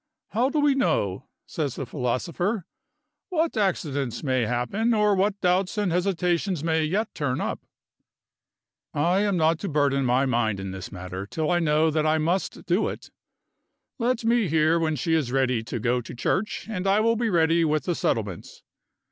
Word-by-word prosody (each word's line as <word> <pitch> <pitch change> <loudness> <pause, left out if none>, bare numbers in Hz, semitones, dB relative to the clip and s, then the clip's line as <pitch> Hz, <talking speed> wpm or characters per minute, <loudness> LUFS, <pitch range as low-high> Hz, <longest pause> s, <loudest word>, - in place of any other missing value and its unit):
"How 240 +6 +1
do 300 - 0
we 290 -1 +4
know," 120 - 0 0.2
says 145 -6 -3
the 135 - -4
philosopher, 170 - -2 0.6
"what 330 -4 0
accidents 150 - -1
may 130 -5 +1
happen, 195 - 0
or 210 -1 +3
what 200 +1 +1
doubts 185 +3 +1
and 205 -4 +1
hesitations 180 -1 0
may 160 -1 +1
yet 205 +8 -1
turn 140 -4 -2
up? - - -2 1.4
I 170 +6 +2
am 200 -2 +1
not 160 0 +2
to 200 - -4
burden 140 -2 +2
my 130 +2 +2
mind 115 -5 0
in 95 0 -5
this 95 0 -7
matter, 95 +1 -6
till 155 +7 -2
I 175 - +3
know 155 0 +2
that 155 0 +1
I 155 +1 +3
must 170 +5 -1
do 180 +5 +1
it. - - -9 0.9
Let 235 -1 0
me 230 -2 +3
hear 160 +1 +3
when 160 -1 0
she 160 +4 -1
is 150 -7 +1
ready 130 -3 +1
to 120 - -4
go 125 +3 +1
to 120 - -9
church, 190 - -1
and 195 -4 -3
I 195 +2 +4
will 230 +1 +3
be 230 0 0
ready 165 -2 +3
with 155 -2 +1
the 175 - 0
settlements. 105 - -3
160 Hz, 180 wpm, -25 LUFS, 130-195 Hz, 1.4 s, we